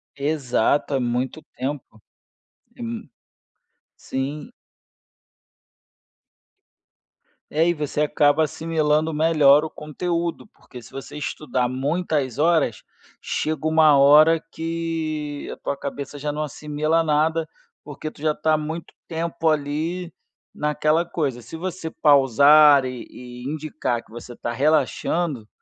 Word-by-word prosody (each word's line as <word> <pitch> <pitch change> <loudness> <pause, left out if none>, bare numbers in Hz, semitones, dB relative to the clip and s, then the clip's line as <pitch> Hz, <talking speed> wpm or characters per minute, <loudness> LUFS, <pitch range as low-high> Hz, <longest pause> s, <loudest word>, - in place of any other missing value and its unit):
Exato. 140 -1 0
É - - +1
muito 125 +4 -2 0.2
tempo. 130 -4 -5 0.8
É - - -15
m 230 - -6 0.9
Sim. 145 - -5 3.0
É, 160 +3 +2
e 175 - +3
você 150 -2 -3
acaba 150 0 +3
assimilando 155 0 0
melhor 150 -2 +5
o 160 - -4
conteúdo, 170 +5 -3
porque 125 -10 -14
se 115 - -15
você 135 +2 -8
estudar 140 -4 -2
muitas 140 -1 -1
horas, 160 -7 +2 0.4
chega 155 0 -2
uma 155 -2 +5
hora 150 +4 +6
que 160 -3 -4
a - - -8
tua 140 - -4
cabeça 140 +1 -6
já 145 +1 -3
não 150 +1 -3
assimila 150 +2 -1
nada, 160 +1 +1 0.4
porque 145 +1 -7
tu 155 - -17
já 155 0 +2
está 155 +1 0
há - - +4
muito 160 +2 -6
tempo 165 0 -1
ali 155 +4 -2 0.4
naquela 150 +2 +1
coisa, 145 -8 -2
se 160 - -9
você 175 -1 -5
pausar 145 -1 +6
e 125 -2 -6
e 125 0 -11
indicar 155 -6 -3
que - - -24
você 120 +1 -9
tá 120 - -4
relaxando, 150 -1 0
150 Hz, 120 wpm, -23 LUFS, 140-160 Hz, 3.0 s, hora